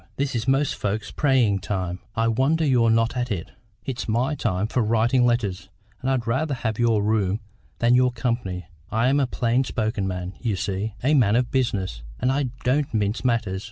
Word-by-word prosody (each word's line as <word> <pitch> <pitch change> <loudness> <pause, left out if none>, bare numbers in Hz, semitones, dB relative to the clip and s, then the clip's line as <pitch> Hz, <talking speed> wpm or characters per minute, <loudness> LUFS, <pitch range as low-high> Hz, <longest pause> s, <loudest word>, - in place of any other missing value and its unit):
This 140 0 -1
is 115 0 -2
most 135 +1 +2
folks' 105 +1 -3
praying 125 -9 +2
time; 90 -2 -3 0.2
I 115 0 +1
wonder 135 +8 +2
you're 125 -5 +3
not 115 +2 +2
at 125 0 -1
it. 90 -7 -4 0.3
It's 130 -3 -4
my 120 +6 +1
time 105 -8 -1
for 125 +3 0
writing 115 +3 +3
letters, 105 -6 -1 0.3
and 130 - -1
I'd 130 -3 0
rather 135 +5 0
have 110 -3 -3
your 115 -3 +3
room 105 -2 +1 0.4
than 120 +1 +3
your 125 0 +4
company. 115 -7 -2 0.3
I'm 125 +6 +2
a 135 - +2
plain 120 +1 +1
spoken 110 -5 -2
man, 90 0 -4
you 115 -5 -1
see, 100 +2 -3
a 145 +4 +3
man 115 -7 +4
of 125 0 +1
business, 100 - -1 0.2
and 130 - +2
I 140 +1 +1 0.2
don't 140 +3 +1
mince 105 +2 0
matters. 115 -6 0
115 Hz, 190 wpm, -24 LUFS, 105-130 Hz, 0.4 s, your